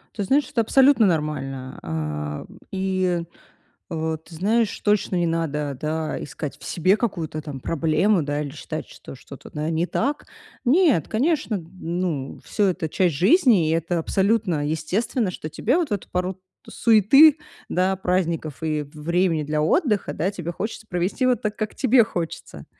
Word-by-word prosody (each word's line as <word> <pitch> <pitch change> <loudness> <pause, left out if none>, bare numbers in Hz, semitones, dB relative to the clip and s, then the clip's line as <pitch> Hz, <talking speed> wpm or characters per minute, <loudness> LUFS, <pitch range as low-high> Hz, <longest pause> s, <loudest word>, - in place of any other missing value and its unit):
Ты 205 - -2
знаешь, 270 +6 +2
это 230 - +1
абсолютно 265 0 +5
нормально, 135 -6 -2
а. 75 -2 -4 0.3
И, 185 -2 0 0.7
э, 160 -1 -2
ты 165 - -14
знаешь, 215 +6 +1
точно 205 -2 +1
не 175 -1 +1
надо, 150 -4 -2
да, 155 0 -3
искать 145 -2 -6
в - - -14
себе 185 +4 +2
какую-то 170 -9 -3
там 145 -3 -7
проблему, 165 +6 +1
да, 145 0 -2
или 145 - -4
считать, 155 +2 -6
что - - -11
что-то, 135 +1 -12
да, 150 +1 -3
не 165 +2 0
так. 285 +9 -1 0.4
Нет, 275 - +3
конечно, 245 - 0
ну, 170 -4 -4
всё 205 - +1
это 170 -3 -2
часть 175 0 +1
жизни, 205 - +4
и - - +1
это 165 +1 0
абсолютно 190 -3 +1
естественно, 185 - -1
что 155 -3 -7
тебе 245 - +1
вот 330 -10 0
эту 200 - -3
пору 180 +1 -2 0.3
суеты, 270 - +6 0.3
да, 185 +2 +1
праздников 170 -5 -1
и 155 -1 0
в 145 - -20
времени 170 -1 +1
для 150 +1 -1
отдыха, 210 - +1
да, 180 +5 0
тебе 175 -3 -5
хочется 220 +3 -5
провести 180 +8 0
вот 250 -1 +2
так, 215 -1 -2
как 215 -1 -3
тебе 255 -2 +4
хочется. 175 -7 -6
175 Hz, 160 wpm, -23 LUFS, 155-215 Hz, 0.7 s, суеты